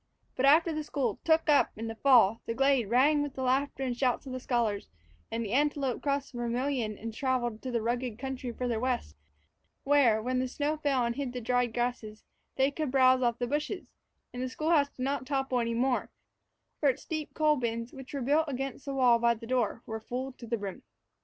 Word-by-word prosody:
But, 270 - +2
after 310 +1 +4
school 275 -7 -2
"took 320 0 +3
up" 295 -2 +4
in 225 - -4
the 225 - -4
fall, 225 -4 +4
the 230 - -2
glade 270 -5 +2
rang 285 +5 +4
with 290 -2 -4
the 260 - -3
laughter 270 +1 0
and 250 -2 -1
shouts 250 +1 0
of 265 - -7
the 255 - -3
scholars, 235 -5 -1 0.4
and 230 +1 -3
the 205 - -5
antelope 280 -2 +1
crossed 280 -1 -1
the 240 - -7
Vermillion 240 -2 -1
and 225 0 -6
traveled 240 -3 -1
to 260 - -5
the 235 -3 -1
rugged 240 -1 -2
country 260 -1 -4
farther 235 -1 -2
west, 250 0 -2 0.7
where, 275 -6 +4
when 255 +3 -1
the 255 - 0
snow 295 +4 -2
fell 275 -5 +1
and 235 +1 -2
hid 270 -3 -3
the 250 - -3
dried 245 0 +1
grass, 245 0 -1 0.5
they 270 +1 +2
could 305 0 -3
browse 255 -1 +4
off 240 -2 +1
the 245 - -1
bushes; 300 +8 -3 0.4
and 250 - -5
the 255 - -2
school 310 +5 -2
house 285 -4 +4
did 255 - -7
not 275 -1 -2
topple 270 -2 0
any 230 -1 -1
more, 250 +1 0 0.7
for 290 - +4
its 260 +1 -3
deep 310 -2 -4
coal 305 -1 +3
bins, 230 -2 -3
which 265 -2 -10
were 280 - -3
built 295 +5 +3
against 270 0 -4
the 275 -1 -4
wall 245 -3 +5
by 235 0 +3
the 230 - -10
door, 240 -2 -1
were 220 0 -5
full 255 +4 -4
to 245 -2 -12
the 235 +1 -1
brim. 200 -2 -6
255 Hz, 220 wpm, -30 LUFS, 235-280 Hz, 0.7 s, wall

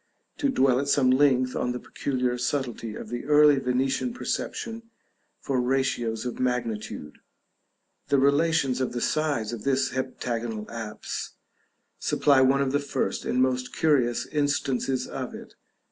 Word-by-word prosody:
to 285 - 0
dwell 135 - +3
at 140 - -2
some 135 -2 +4
length 130 -2 +3
on 125 - -1
the 125 - -4
peculiar 125 -2 -2
subtlety 120 -3 -2
of - - -8
the 120 +1 -4
early 150 -1 +6
Venetian 135 - 0
perception 230 -2 -4 0.5
for 130 -2 -1
ratios 125 -3 0
of 125 - -4
magnitude; 115 -11 -3 0.9
the 140 - +3
relations 140 -1 +2
of 130 - -1
the 120 - -2
sides 145 -5 0
of 115 - -6
this 135 -1 +1
heptagonal 120 -4 -3
apse 110 -2 -6 0.6
supply 140 -3 +3
one 135 +1 +4
of 135 - -1
the 145 - +2
first 140 -1 -2
and 130 +1 +2
most 130 -1 -1
curious 130 -7 +2
instances 135 -3 0
of - - -6
it. - - -11
130 Hz, 145 wpm, -26 LUFS, 125-140 Hz, 0.9 s, early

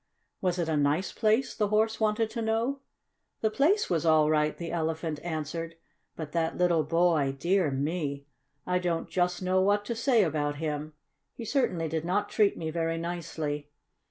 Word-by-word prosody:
"Was 180 -1 0
it 170 -2 -1
a 160 - 0
nice 145 +5 +1
place?" 225 +4 +2
the 210 - +1
Horse 220 +1 +1
wanted 220 0 +1
to 230 - -3
know. 225 +5 0 0.6
"The 220 - +1
place 330 - +3
was 170 -3 0
all 155 -2 +4
right," 150 0 +1
the 170 -1 -5
Elephant 160 -2 -2
answered. 165 0 -4 0.4
"But 155 -2 -6
that 165 0 -1
little 175 -3 +3
boy! 160 -4 +2
Dear 175 +2 +2
me! 140 0 -2 0.4
I 180 0 +1
don't 175 -2 -1
just 180 0 0
know 185 +1 +2
what 205 +2 +2
to 235 - -2
say 230 -1 +3
about 145 -3 -1
him, 150 0 -4 0.4
he 230 - -7
certainly 185 - 0
did 160 0 -2
not 205 +4 0
treat 210 -2 +3
me 160 -1 -3
very 165 0 -1
nicely. 160 -3 -4
170 Hz, 175 wpm, -28 LUFS, 155-205 Hz, 0.6 s, all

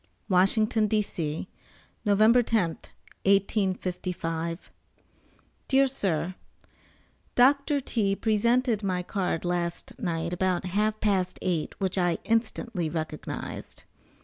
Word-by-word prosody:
WASHINGTON, 215 +4 +3
D.C., 180 -7 -2 0.6
November 215 +4 +5
10th, 215 -8 0 0.4
1855. 185 -4 0 1.0
DEAR 275 0 +4
SIR: 185 - -1 1.0
Doctor 280 +3 +4
T. 210 -6 0
presented 230 +2 +2
my 185 -3 -1
card 180 -3 -2
last 175 -1 -3
night 170 -1 -2
about 180 0 0
half 210 +4 0
past 190 -4 +1
eight 175 -4 -2
which 190 0 0
I 175 -2 +2
instantly 225 -5 -1
recognized. 155 -1 -5
195 Hz, 95 wpm, -27 LUFS, 175-220 Hz, 1.0 s, November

